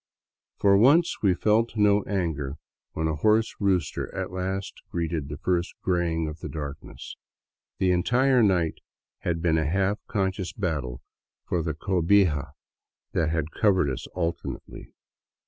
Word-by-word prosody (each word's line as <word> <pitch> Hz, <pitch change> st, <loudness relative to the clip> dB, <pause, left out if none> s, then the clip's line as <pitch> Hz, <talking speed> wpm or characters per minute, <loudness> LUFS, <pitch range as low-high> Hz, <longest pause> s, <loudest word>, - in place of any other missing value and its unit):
For 100 Hz, -1 st, +5 dB
once 150 Hz, +9 st, +4 dB
we 95 Hz, -4 st, +3 dB
felt 110 Hz, +4 st, +1 dB
no 105 Hz, 0 st, +4 dB
anger 80 Hz, -8 st, -2 dB, 0.4 s
when 80 Hz, 0 st, -1 dB
a 80 Hz, -, 0 dB
hoarse 110 Hz, +6 st, +3 dB
rooster 95 Hz, -3 st, 0 dB
at -, -, -3 dB
last 95 Hz, +2 st, -4 dB
greeted 80 Hz, -4 st, -2 dB
the 75 Hz, -, -5 dB
first 90 Hz, +2 st, -1 dB
graying 85 Hz, -3 st, 0 dB
of 75 Hz, +1 st, -7 dB
the 75 Hz, -, -6 dB
darkness. 75 Hz, 0 st, -7 dB, 0.6 s
The 95 Hz, -2 st, +2 dB
entire 125 Hz, +8 st, +3 dB
night 90 Hz, -7 st, +2 dB, 0.4 s
had 85 Hz, -1 st, -2 dB
been 80 Hz, -2 st, +3 dB
a 75 Hz, -1 st, 0 dB
half 100 Hz, +4 st, +1 dB
con 95 Hz, -2 st, 0 dB
scious 95 Hz, -1 st, -6 dB
battle 70 Hz, -10 st, -2 dB, 0.4 s
for 85 Hz, -, 0 dB
the 80 Hz, -2 st, -3 dB
cohija 90 Hz, -5 st, +2 dB, 0.6 s
that 80 Hz, -2 st, +1 dB
had 80 Hz, -1 st, -1 dB
covered 95 Hz, -9 st, +2 dB
us 65 Hz, -, -5 dB
alternately. 85 Hz, -2 st, -5 dB
90 Hz, 145 wpm, -26 LUFS, 80-100 Hz, 0.6 s, For